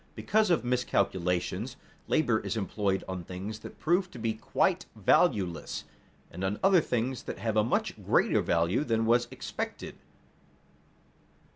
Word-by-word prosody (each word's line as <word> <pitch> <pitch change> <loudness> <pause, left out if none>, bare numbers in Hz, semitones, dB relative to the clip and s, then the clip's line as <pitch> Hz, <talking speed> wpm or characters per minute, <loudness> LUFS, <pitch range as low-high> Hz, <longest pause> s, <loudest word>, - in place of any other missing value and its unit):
Because 215 -2 +2
of 170 -8 +2
miscalculations, 100 -2 0 0.3
labor 120 -8 +2
is 115 - -3
employed 100 -2 -1
on 95 -2 -4
things 95 +5 -6
that - - -10
prove 175 +4 +1
to - - -11
be 115 -1 -1
quite 110 - 0
valueless, 85 -6 +1 0.5
and 90 +3 -6
on 95 +2 -1
other 190 -3 +6
things 125 -1 -1
that - - -6
have 110 +2 -2
a 110 - +4
much 115 - -1
greater - - +3
value 85 - +1
than 115 -4 +1
was 120 +1 +3
expected. - - -5
110 Hz, 140 wpm, -29 LUFS, 95-125 Hz, 0.5 s, other